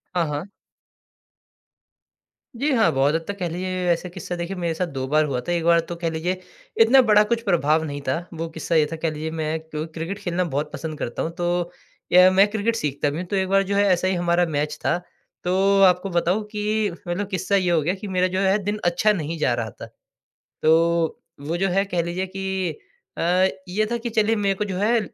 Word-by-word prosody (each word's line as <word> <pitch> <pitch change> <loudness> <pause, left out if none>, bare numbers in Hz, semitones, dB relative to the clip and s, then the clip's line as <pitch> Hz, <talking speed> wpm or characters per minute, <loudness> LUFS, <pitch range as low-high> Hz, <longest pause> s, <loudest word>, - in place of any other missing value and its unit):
हाँ, 170 - +2
हाँ। 150 +3 -3 2.2
जी 295 +1 +2
हाँ। 225 -4 +4
बहुत 140 +3 +2
हद 165 - 0
तक 200 0 -4
कह 175 -3 -2
लीजिए 185 +1 -3
ऐसा 175 +1 -1
किस्सा 180 0 -6
देखिए 175 +2 -4
मेरे 170 -2 -1
साथ 175 +2 -2
दो 130 0 -2
बार 155 +3 +3
हुआ 135 -4 -2
था। 175 - -4
एक 170 -1 0
बार 170 0 +5
तो - - -3
कह 165 - 0
लीजिए 175 +3 -2 0.4
इतना 255 +4 +7
बड़ा 210 -3 +5
कुछ 235 -1 +1
प्रभाव 160 -4 +2
नहीं 145 -2 -5
था। 130 - +1 0.2
वो 165 0 -4
किस्सा 160 +1 -3
ये 155 -2 +5
था - - -2
कह 165 0 -1
लीजिए 155 +1 -4
मैं 160 0 -1 0.2
क्रिकेट 160 +4 -4
खेलना 180 -2 -1
बहुत 150 -1 -3
पसंद 155 -2 -5
करता 120 - -3
हूँ 165 - -2
तो 175 0 -1 0.4
या 180 +1 +8
मैं 195 +2 +5
क्रिकेट 220 +2 0
सीखता 145 -6 -1
भी 145 - -4
हूँ 180 - -4
तो 200 - -2
एक 190 -1 +1
बार 195 0 +4
जो - - +1
है 200 - +4
ऐसे 180 +1 0
ही 190 - 0
हमारा 175 0 +2
मैच 150 -2 -2
था। 170 - +2 0.5
तो 195 +2 +3
आपको 180 +1 +4
बताऊँ 180 +4 +1
कि 210 -1 0 0.2
मतलब 185 +3 -2
किस्सा 190 +1 0
ये 185 -3 +2
हो 165 -2 +3
गया 175 +5 0
कि 200 +1 -7
मेरा 185 -1 +1
जो - - +1
है 195 +1 +3
दिन 205 +2 -2
अच्छा 175 +5 +3
नहीं 165 -3 -3
जा 125 - +2
रहा 115 -2 -2
था। - - -10 0.8
तो 165 +1 +3 0.2
वो 160 +4 -3
जो 195 +2 +1
है 195 +2 +2
कह 180 -4 -1
लीजिए 175 +3 -3
कि 190 -1 -3 0.5
अ, 180 +2 +3 0.2
ये 215 +4 0
था 235 - 0
कि 235 0 -4
चलिए 220 0 +2
मेरे 200 -2 +1
को 210 - -2
जो 195 -3 -4
है, 225 +5 +2
175 Hz, 225 wpm, -23 LUFS, 160-195 Hz, 2.2 s, या